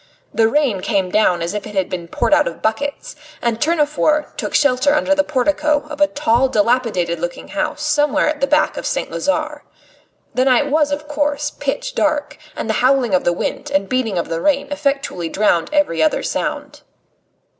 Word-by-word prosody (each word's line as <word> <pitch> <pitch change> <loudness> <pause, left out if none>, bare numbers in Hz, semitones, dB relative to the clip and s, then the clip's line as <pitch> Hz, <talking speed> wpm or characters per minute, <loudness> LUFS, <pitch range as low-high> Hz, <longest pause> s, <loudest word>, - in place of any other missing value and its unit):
The 225 -1 +3
rain 270 -8 +1
came 185 -1 0
down 180 -5 +2
as 170 +3 -3
if 210 -1 -4
it 210 - -10
had 190 -2 +1
been 175 -2 -5
poured 235 - 0
out 300 0 +4
of - - -6
buckets, 280 +9 -3 0.2
and 230 -1 -2
Tournefort 300 -1 +1
took - - -4
shelter 285 0 +3
under 290 -1 +2
the 290 0 +2
portico 300 +1 0
of 300 0 -6
a 295 - +6
tall, 265 -3 +1
dilapidated 210 -7 +1
looking 175 +1 -5
house 300 0 -3
somewhere 295 -1 +2
at 300 -1 -2
the 275 - +2
back 300 +2 +2
of - - -3
St. - - -2
Lazare. 300 +1 -2 0.7
The 255 - +1
night 270 +2 +3
was, 300 -1 +2
of 295 +1 -3
course, 295 0 -1
pitch - - -4
dark, 305 -8 -1 0.2
and - - -4
the 220 - 0
howling 255 -5 +3
of 185 - +2
the 175 - +3
wind 175 - -3
and 195 0 0
beating 230 -6 -1
of 170 - -1
the 165 0 -3
rain 280 -1 +1
effectually 275 - -2
drowned 175 -5 +1
every 295 - +1
other 310 - +2
sound. - - -4
280 Hz, 190 wpm, -18 LUFS, 215-300 Hz, 0.7 s, a